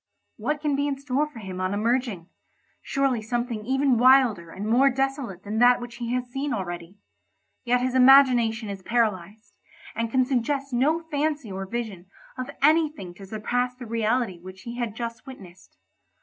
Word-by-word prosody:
What 300 -1 -2
can 295 -2 0
be 285 +1 0
in 280 -1 -2
store 280 +2 -1
for 295 - -14
him 190 -4 -6
on 185 +2 -1
emerging? 225 -5 -1 0.5
Surely 270 -4 0
something 235 0 -3
even 265 -2 +2
wilder 245 -9 +4
and 195 +5 -6
more 255 +5 +5
desolate 270 -7 -2
than 210 +2 -3
that 245 +1 +6
which 240 -1 -8
he 235 -1 -4
has 250 0 -1
seen 270 +3 -3
already; 175 -1 -6 0.7
yet 245 +1 +2
his 255 0 -1
imagination 250 -4 +5
is 200 -1 -6
paralysed, 210 -1 -2 0.4
and 230 0 -2
can 255 +2 +2
suggest 270 +1 -1
no 305 +7 +2
fancy 290 -5 -1
or 190 0 -5
vision 210 -5 -5 0.3
of 255 +1 -5
anything 305 - +2
to 195 +2 -12
surpass 245 +4 -2
the 250 -1 -9
reality 225 -3 -1
which 185 +2 -12
he 235 0 -7
had 235 -3 -3
just 235 +1 -6
witnessed. 190 -9 -13
240 Hz, 170 wpm, -25 LUFS, 210-270 Hz, 0.7 s, that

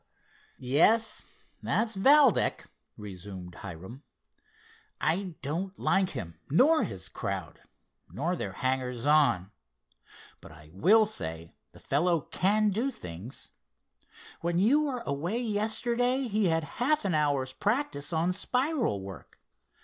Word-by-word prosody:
"Yes, 210 - +3 0.4
that's 220 -1 0
Valdec," 270 +4 +4 0.3
resumed 95 -3 -9
Hiram. 95 - -9 1.0
"I 175 +2 -1
don't 180 +7 -3
like 190 -1 +2
him, 85 - -7
nor 285 - +5
his 95 -3 -5
crowd, 95 -4 -5 0.5
nor 170 +6 -2
their 100 - -4
hangers 130 0 -2
on, 145 -11 +3 0.9
but - - -13
I 75 -1 -15
will 215 - +5
say 80 - -5 0.2
the - - -16
fellow 165 +3 +1
can 210 +6 +1
do 230 +8 0
things. 90 - -9 0.9
When 170 0 -1
you 270 +11 +4
were 255 -4 -3
away 170 +11 -2
yesterday 240 +3 0
he 210 -2 +1
had 165 -1 +1 0.2
half 300 0 +2
an 190 - +1
hour's 140 -4 +1
practice 205 - -1
on 170 +2 +1
spiral 250 - -1
work. 95 0 -11
170 Hz, 120 wpm, -29 LUFS, -, 1.0 s, nor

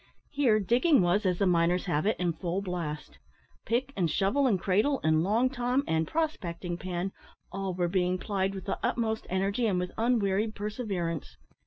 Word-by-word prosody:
Here 260 -7 +3
digging 240 - +3
was, 185 +3 +2
as 180 -1 +1
the 200 - +2
miners 175 0 +2
have 170 0 0
it, 215 - +2
in 175 -2 0
full 175 +4 -3
blast. 155 - -5 0.5
Pick, 255 +4 0
and 175 -4 +1
shovel, 200 - +2
and 200 -7 +2
cradle, 210 +10 +2
and 155 0 +3
long 220 +7 +2
tom, 255 +1 0
and 160 0 0
prospecting 180 - -2
pan 185 +1 -3 0.4
all 195 -1 -3
were 175 -1 +1
being 180 0 +1
plied 195 0 -1
with 190 - -7
the - - -2
utmost 220 -2 -1
energy 200 +5 0
and 195 -4 +1
with 180 0 -2
unwearied 220 -2 +1
perseverance. 200 - -4
195 Hz, 175 wpm, -29 LUFS, 175-225 Hz, 0.5 s, Here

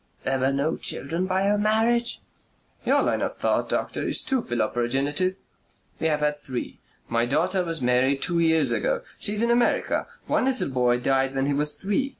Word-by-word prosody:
"There 135 0 0
were 130 +1 +2
no 140 +4 0
children 165 +7 -2
by 190 +1 +1
your 205 +1 +2
marriage?" 225 +3 +2 0.7
"Your - - +4
line - - 0
of - - -3
thought, - - 0
doctor, - - -2
is - - 0
too 265 -3 0
philoprogenitive. 135 - 0 0.6
We 160 - +1
have 150 -1 0
had 150 0 0
three. 125 -2 -6 0.3
My 115 +1 +1
daughter 180 +8 +1
was 165 -5 -2
married 130 +3 +2
two 170 -2 0
years 160 -1 +3
ago. - - 0 0.2
She 205 - +1
is 215 - -1
in 235 - +2
America. 240 0 +1 0.2
One - - +1
little 260 - 0
boy 125 -2 +2
died 135 +1 +1
when 135 0 +1
he 145 - +1
was 150 +1 +1
three. 205 - -1
155 Hz, 185 wpm, -25 LUFS, 135-205 Hz, 0.7 s, Your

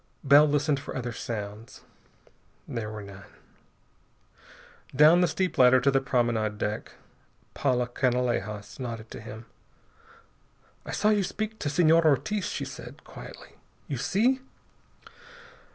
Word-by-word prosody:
Bell 145 +2 +7
listened 145 -1 +1
for - - -8
other 120 -2 -3
sounds. 110 -1 -7 0.9
There 115 -3 -4
were 105 -1 -7
none. 100 -1 -12 1.7
Down 155 +5 +7
the 180 - +4
steep 185 0 -2
ladder 130 0 +7
to 140 +3 +2
the 135 0 +2
promenade 115 -5 0
deck. 105 0 -4 0.6
Paula 125 -3 0
Canalejas 120 -5 -1
nodded 115 -3 -6
to - - -8
him. 110 +1 -9 1.4
"I - - -4
saw 210 - +2
you 210 -1 +3
speak 215 +3 -4
to 145 - -2
Senor 165 +2 +4
Ortiz," 155 +8 +1
she - - -3
said - - -10
quietly. - - -12 0.3
"You - - -3
see?" 250 +7 +1
130 Hz, 125 wpm, -27 LUFS, 110-155 Hz, 1.7 s, Bell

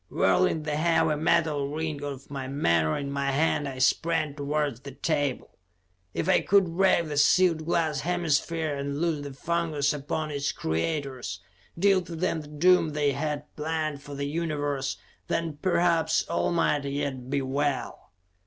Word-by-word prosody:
Whirling 155 - +2
the 150 -1 -2
heavy 160 -1 +2
metal 155 -2 +1
ring 155 0 -3
of 140 -1 -7
my 135 -2 -4
menore 85 - +1
in 140 -1 -4
my 140 0 -1
hand, 145 +1 +1
I 135 -1 -6
sprang 155 +3 +1
towards 145 -3 -1
the 140 0 -10
table. 145 -4 -2 0.6
If - - -1
I 190 - +4
could 190 -4 +3
break 185 -3 +3
the 145 -1 -4
sealed 165 +1 +4
glass 160 -4 +1
hemisphere, 165 -1 0
and 140 0 -3
loose 165 -3 0
the 140 - -6
fungus 155 -1 0
upon 150 +2 -3
its 140 -1 -1
creators; 125 - -2 0.4
deal 195 +1 +4
to 175 -1 -8
them 165 -1 -1
the 150 - -12
doom 160 +1 +3
they 145 -1 +2
had 145 +1 -2
planned 155 -2 -2
for 145 0 -9
the 140 0 -3
universe, 145 -3 -2 0.3
then 165 -3 -2
perhaps 170 -3 +2
all 170 - 0
might 150 -4 +1
yet 140 -2 -3
be 140 0 0
well. 140 -2 -2
150 Hz, 160 wpm, -27 LUFS, 140-165 Hz, 0.6 s, I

